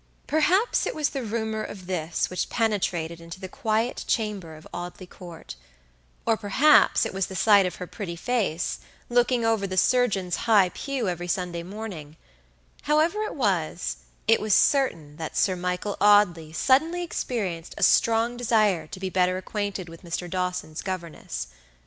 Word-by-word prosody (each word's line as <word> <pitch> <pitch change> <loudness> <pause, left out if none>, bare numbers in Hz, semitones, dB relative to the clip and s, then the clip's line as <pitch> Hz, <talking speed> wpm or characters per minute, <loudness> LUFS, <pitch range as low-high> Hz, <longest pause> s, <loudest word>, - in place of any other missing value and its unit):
Perhaps 360 +9 +2
it - - -3
was 300 -2 +1
the 275 - -4
rumor 220 -1 -2
of 185 -3 -8
this 170 -3 -1
which 180 - -2
penetrated 180 -7 -1
into 165 +2 -9
the 190 - -6
quiet 220 +5 -1
chamber 200 -8 -2
of 155 - -13
Audley 175 +1 -6
Court; 175 - -11 0.7
or, 225 - +3
perhaps, 245 +9 +4
it - - -4
was 190 -1 -1
the 190 - -8
sight 200 0 +5
of 180 - -5
her 180 - -6
pretty 180 -2 -6
face, 190 -4 -1 0.3
looking 240 0 +2
over 220 -3 +1
the 185 0 -4
surgeon's 200 -6 +2
high 205 -5 +5
pew 265 +3 -3
every 175 -1 -3
Sunday 175 -1 -2
morning; 175 -5 -8 0.6
however 315 +7 +2
it 430 - -3
was, 160 - -1 0.3
it - - +4
was 215 -2 +3
certain 165 - +2
that 160 -1 -5
Sir 185 - +2
Michael 180 +3 -3
Audley 190 -6 +4
suddenly 315 - +2
experienced 195 - -3
a - - -1
strong 230 +1 +3
desire 215 -8 +2
to 185 - -9
be 190 0 -3
better 185 0 +2
acquainted 200 -1 -4
with 165 0 -12
Mr. 175 0 -4
Dawson's 180 -3 -3
governess. 170 - -5
190 Hz, 160 wpm, -25 LUFS, 175-225 Hz, 0.7 s, sight